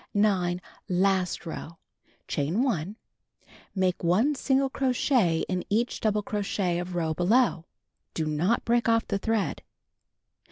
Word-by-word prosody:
9. 185 -4 +2 0.3
Last 185 0 +1
row: 165 0 -7 0.5
Chain 160 - 0
1. 200 - -1 0.8
Make 185 -2 0
1 205 - +3
single 270 -1 +1
crochet 250 - +1
in 185 -1 -2
each 230 +4 0
double 210 -1 +1
crochet 195 -4 -1
of 180 0 -5
row 160 -2 0
below. 180 0 +2 0.5
Do 160 - -1
not 160 +9 0
break 235 0 +2
off 230 0 +2
the 200 - -1
thread. 225 -1 -1
195 Hz, 125 wpm, -27 LUFS, 175-230 Hz, 0.8 s, 1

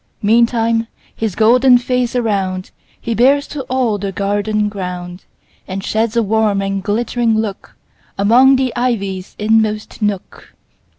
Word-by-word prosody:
Meantime 230 +1 +2 0.3
his 220 -5 -3
golden 245 +3 +5
face 250 0 -1
aroundHe 195 -6 -1 0.4
bears 275 +5 +3
to 295 - -6
all 245 -5 0
the 195 0 -3
garden 205 +2 -1
ground, 180 -3 -6 0.4
And 195 0 -5
sheds 225 +2 -1
a 230 - +3
warm 215 -1 +1
and 195 0 -2
glittering 225 +2 0
lookAmong 220 +4 +1
the 260 -2 -1
ivy's 200 -7 -2
inmost 215 0 0
nook. 205 -3 -4
220 Hz, 120 wpm, -16 LUFS, 200-240 Hz, 0.4 s, golden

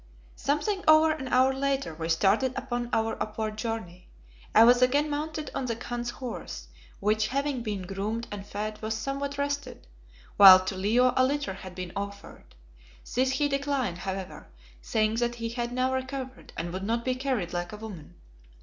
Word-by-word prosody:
Something 380 +8 -1
over 315 0 +7
an 295 -4 -4
hour 255 +1 +4
later 275 -6 -1
we 160 +1 -5
started 200 +10 +2
upon 240 -1 -3
our 225 0 0
upward 215 0 -3
journey. 215 -6 -5 0.5
I 220 - +9
was 245 +1 +6
again 285 +4 +3
mounted 305 0 -3
on 265 - -2
the 230 - -1
Khan's 240 +1 -4
horse, 250 0 -7 0.3
which 215 +2 +1
having 275 -1 -1
been 210 -4 -3
groomed 205 +5 -3
and 205 -1 -5
fed 210 +1 -5
was 220 0 -2
somewhat 275 +2 -3
rested, 285 - -3 0.5
while 185 -2 +10
to 190 - -2
Leo 230 +7 +3
a 260 - +4
litter 285 -4 0
had 185 -1 -10
been 185 -1 -5
offered. 200 - -7 0.6
This 260 +1 +2
he 290 +1 +2
declined, 275 -9 -1
however, 190 0 -5 0.3
saying 215 - 0
that 240 0 0
he 230 -1 -4
had 240 0 -3
now 255 +1 0
recovered 260 0 -5
and 170 +1 -4
would 185 - -3
not 230 +3 -1
be 255 - +1
carried 255 -9 -2
like 175 0 -3
a 210 - -7
woman. 205 -8 -9
240 Hz, 175 wpm, -28 LUFS, 205-265 Hz, 0.6 s, while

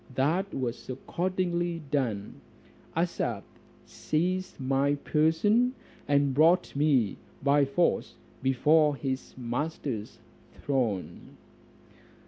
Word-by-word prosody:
That 170 +9 +1
was 125 -2 -4
accordingly 175 +3 -2
done. 110 - -2 0.6
Asaph 125 - -1 0.4
seized 185 +4 -2
my 135 +2 +1
person, 165 - +2 0.3
and 140 -1 +3
brought 165 +5 +4
me 140 -8 +2 0.3
by 140 0 +4
force 170 +6 0 0.3
before 150 +3 +3
his 130 -2 -4
master's 125 -2 -4 0.4
throne. 120 -9 -3
145 Hz, 85 wpm, -28 LUFS, 130-170 Hz, 0.6 s, brought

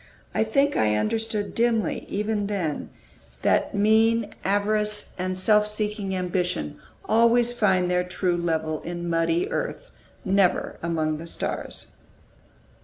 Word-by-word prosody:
I - - +2
think 275 +6 +2
I 105 -1 +2
understood 210 - -1
dimly, 230 -2 0
even 210 0 -1
then, 180 -8 -2 0.5
that - - +2
mean 220 +2 +3
avarice 210 +1 0
and 185 0 -2
self 210 +2 +4
seeking 210 -2 -2
ambition 180 - -2 0.3
always 235 +2 +4
find 190 -6 +2
their 180 0 +2
true 180 0 -1
level 160 -2 -1
in 175 0 -5
muddy 165 0 +1
earth, - - -4 0.3
never 190 -2 +1
among 155 -2 -1
the 165 - -8
stars. - - -5
200 Hz, 120 wpm, -25 LUFS, 175-220 Hz, 0.5 s, self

